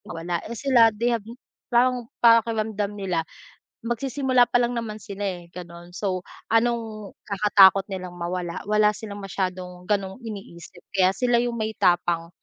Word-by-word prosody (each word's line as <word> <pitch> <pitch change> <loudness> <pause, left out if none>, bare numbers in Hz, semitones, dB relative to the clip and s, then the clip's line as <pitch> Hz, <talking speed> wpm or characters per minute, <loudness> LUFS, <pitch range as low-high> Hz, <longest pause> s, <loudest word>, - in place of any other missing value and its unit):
Mawala 170 +1 -4
eh 235 - -6
sila, 245 -3 +5
they 235 +3 -1
have 230 - -1 0.5
parang 245 -1 +2
pakiramdam 220 -3 +3
nila 185 -4 -1 0.6
magsisimula 255 +2 +1
pa 245 0 +1
lang 240 0 0
naman 215 -2 -4
sila, 200 -1 -6
eh 175 -3 -4
gano'n. 175 0 -10
So, 190 -3 -2 0.3
anong 225 -3 0
kakatakot 200 -1 +5
nilang 185 -2 -6
mawala, 175 0 -4
wala 210 0 +4
silang 205 -1 -8
masyadong 180 -1 -4
ganong 195 +1 -1
iniisip 195 -6 -10
kaya 190 -1 +3
sila 245 0 +2
yung 240 -1 -2
may 220 -1 -2
tapang 175 -4 +1
205 Hz, 145 wpm, -24 LUFS, 185-230 Hz, 0.6 s, sila